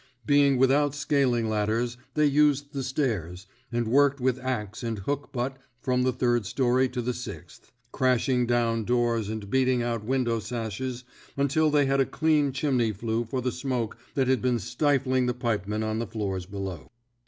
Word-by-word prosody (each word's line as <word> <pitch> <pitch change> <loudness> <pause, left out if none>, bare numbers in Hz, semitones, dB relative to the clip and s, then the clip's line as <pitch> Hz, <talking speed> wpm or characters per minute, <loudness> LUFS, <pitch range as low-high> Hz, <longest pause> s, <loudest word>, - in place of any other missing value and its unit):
Being 140 0 +4
without 140 +2 +3
scaling 135 -5 +1
ladders, 110 +3 0 0.2
they 150 - +3
used 145 0 +2
the 140 - -2
stairs, 110 - -2 0.3
and 120 -1 -1
worked 140 +3 +3
with 130 0 +1
axe 115 -5 -3
and 115 -2 -3
hook 140 +8 -3
butt 130 0 -3 0.2
from 125 0 0
the 130 0 +2
third 120 -4 0
story 130 +1 +2
to 125 -1 -3
the 125 +1 -1
sixth, 105 -9 -9 0.2
crashing 125 -1 +2
down 115 -2 +1
doors 120 -2 +1
and 110 -2 -5
beat 130 +5 +2
ing 125 -2 +2
out 115 -2 -2
window 120 -1 0
sashes 120 +2 -4 0.3
until 140 +3 +2
they 145 -1 +3
had 135 0 +1
a - - +3
clean 155 -3 +2
chimney 130 -4 +1
flue 115 +3 -2
for 130 +3 -3
the 125 0 -1
smoke 125 -4 -2 0.2
that 135 -2 +2
had 130 0 +2
been 125 -1 +1
stifling 130 - +1
the 125 - 0
pipemen 110 -3 -1
on 110 0 -1
the 115 - -3
floors 100 -4 -3
below. 95 -8 -6
125 Hz, 175 wpm, -27 LUFS, 115-135 Hz, 0.3 s, Being